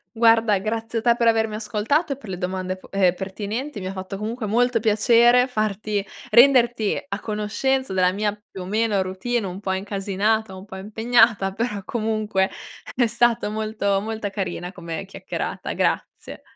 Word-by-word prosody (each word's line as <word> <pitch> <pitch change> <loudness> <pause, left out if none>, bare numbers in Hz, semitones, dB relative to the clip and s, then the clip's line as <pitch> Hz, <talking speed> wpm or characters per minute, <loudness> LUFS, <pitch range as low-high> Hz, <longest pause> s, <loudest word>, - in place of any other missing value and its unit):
Guarda 225 -2 +4
grazie 225 +3 -2
a - - -6
te 235 -1 +4
per 235 -1 +1
avermi 225 -1 +2
ascoltato 220 +9 0
e - - -10
per 245 -7 -12
le 185 - -4
domande 185 0 -3
p - - -16
ehm, 190 -3 +3
pertinenti 205 +7 -5
mi 185 - -7
ha - - -3
fatto 190 0 -6
comunque 220 +2 -4
molto 245 +2 +2
piacere 235 +3 +5
farti 215 -3 -1 0.3
renderti 240 -2 +5
a 200 - -3
conoscenza 215 +4 -1
della 185 -1 +3
mia, 205 +1 -1 0.2
più 190 - -8
o - - -8
meno, 210 0 +1
routine 200 +5 -2
un 185 0 -5
po' 200 -2 -3
incasinata, 200 +2 -1
un 190 +1 -10
po' 190 -2 -9
impegnata 220 0 +2
però 215 -1 -2
comunque 215 -4 0 0.5
è 245 - +3
stato 235 -1 +1
molto 215 -2 -1
molto 220 -1 -4
carina 185 -3 -4
come 170 -1 -6
chiacchierata. 195 - -5
Grazie. - - -2
215 Hz, 165 wpm, -23 LUFS, 195-230 Hz, 0.5 s, piacere